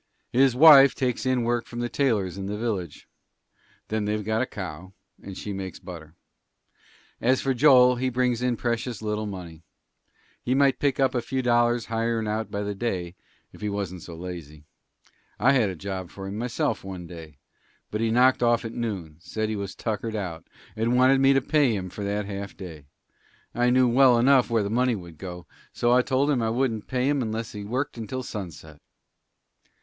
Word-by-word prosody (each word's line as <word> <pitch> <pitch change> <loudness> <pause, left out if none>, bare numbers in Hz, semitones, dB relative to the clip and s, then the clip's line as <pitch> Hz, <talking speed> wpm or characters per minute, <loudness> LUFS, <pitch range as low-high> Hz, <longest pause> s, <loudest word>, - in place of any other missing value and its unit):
"His 130 0 +4
wife 140 -1 +8
takes 130 -1 -1
in 130 -2 +1
work 120 0 -1
from 120 - -7
the 120 - -1
tailors 110 -10 0
in 95 0 -5
the 100 - -3
the - - -3
village. 100 -9 -4 0.8
Then 110 -1 -1
they've 105 0 -2
got 110 +1 0
a 130 - -1
cow, 95 -1 -8 0.3
and 95 -2 -9
she 105 - -5
makes 95 -1 -6
butter. 80 -3 -11 1.1
As 130 +2 +3
for 135 - 0
Joel, 125 -2 +6
he 130 +1 0
brings 125 -1 0
in 125 -2 0
precious 120 -1 -3
little 105 0 -2
money. 90 -5 -8 0.8
He 130 - 0
might 140 -1 +3
pick 140 -2 0
up 135 -1 +3
a 120 - 0
few 130 +2 -3
dollars 120 -1 +2
hirin' 115 -1 -1
out 110 +1 -2
by 100 0 -3
the 105 0 -3
day, 95 -5 -3 0.4
if - - -15
he 105 - -2
wasn't 95 -3 -4
so 85 - -9
lazy. 80 -4 -8 0.7
I 130 - +5
had 125 -7 +3
a 95 - -5
job 95 0 -5
for 95 - -9
him 95 +1 -5
myself 115 -1 -2
one 95 -2 -7
day, 80 -4 -11 0.5
but 105 - -2
he 115 - +1
knocked 125 +3 +4
off 120 -1 +2
at 115 - -5
noon 95 -10 -4
said 110 +6 -3
he 110 - -2
was 100 -2 -5
tuckered 110 0 -3
out, 90 -6 -5 0.3
and 115 +3 +1
wanted 130 +1 +5
me 135 0 +6
to 135 - +3
pay 140 -6 +2
him 95 -2 -5
for 105 - -6
that 105 +1 -2
half 100 0 -6
day. 80 -7 -10 0.7
I 120 0 +2
knew 125 0 +4
well 125 0 +5
enough 130 +1 +4
where 115 -2 +2
the 100 - -3
money 125 +1 +2
would 85 -5 -10
go, 90 -1 -8 0.3
so 120 - +1
I 125 +1 +5
told 135 +3 +1
him 130 -4 +1
I 110 - 0
wouldn't 115 -2 -1
pay 130 0 0
him 145 -1 +1
unless 110 -1 -3
he 105 -1 -7
worked 125 +4 -3
until 130 +4 -4
sunset." 85 -9 -8
110 Hz, 200 wpm, -25 LUFS, 95-125 Hz, 1.1 s, wife